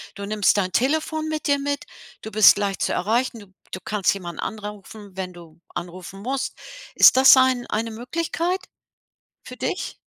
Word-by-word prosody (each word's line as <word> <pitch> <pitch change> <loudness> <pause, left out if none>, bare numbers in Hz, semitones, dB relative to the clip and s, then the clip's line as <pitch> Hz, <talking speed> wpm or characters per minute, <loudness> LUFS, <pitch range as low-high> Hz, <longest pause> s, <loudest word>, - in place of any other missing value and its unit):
Du 200 - -6
nimmst 210 0 +2
dein 185 -2 0
Telefon 310 - 0
mit 310 -1 -4
dir 285 -1 +2
mit. 285 0 -3 0.4
Du 220 - -7
bist 215 -1 +7
leicht 200 -2 -2
zu - - 0
erreichen. 230 +4 0
Du 200 -2 -16 0.2
du 185 - -5
kannst 210 -3 +1
jemanden 175 -4 -8
anrufen, 210 -1 -8
wenn 185 -1 -5
du 170 -2 -15 0.2
anrufen 180 +2 -7
musst. 265 +4 -3 0.4
Ist - - +7
das 265 0 +8
ein 260 -2 +2
eine 225 +2 -2
Möglichkeit 335 - -2 0.8
für - - -11
dich? - - -4
215 Hz, 165 wpm, -23 LUFS, 195-265 Hz, 0.8 s, das